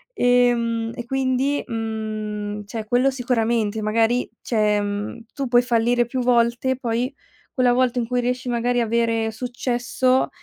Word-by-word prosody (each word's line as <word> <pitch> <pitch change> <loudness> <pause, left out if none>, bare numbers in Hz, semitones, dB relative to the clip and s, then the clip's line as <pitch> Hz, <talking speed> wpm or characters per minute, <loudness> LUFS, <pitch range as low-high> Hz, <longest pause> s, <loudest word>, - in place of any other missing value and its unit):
Ehm 235 -2 +2
e 240 - -6
quindi 265 +2 0
mhmm, 215 -2 -4
cioè, 215 +1 -5
quello 245 +4 +3
sicuramente, 230 -4 0
magari 225 +3 +1
cioè, 210 -3 +1
mhmm, 205 +3 -4
tu 275 -2 -3
puoi 240 0 +5
fallire 240 0 +2
più 250 +2 -3
volte, 240 +1 +2
poi 245 +1 -2 0.4
quella 250 -2 +3
volta 250 0 +2
in 230 - -2
cui 250 0 0
riesci 250 +1 -2
magari 245 +1 +1
a 230 - +1
avere 230 -1 +1
successo 245 +2 0
240 Hz, 145 wpm, -22 LUFS, 225-250 Hz, 0.4 s, puoi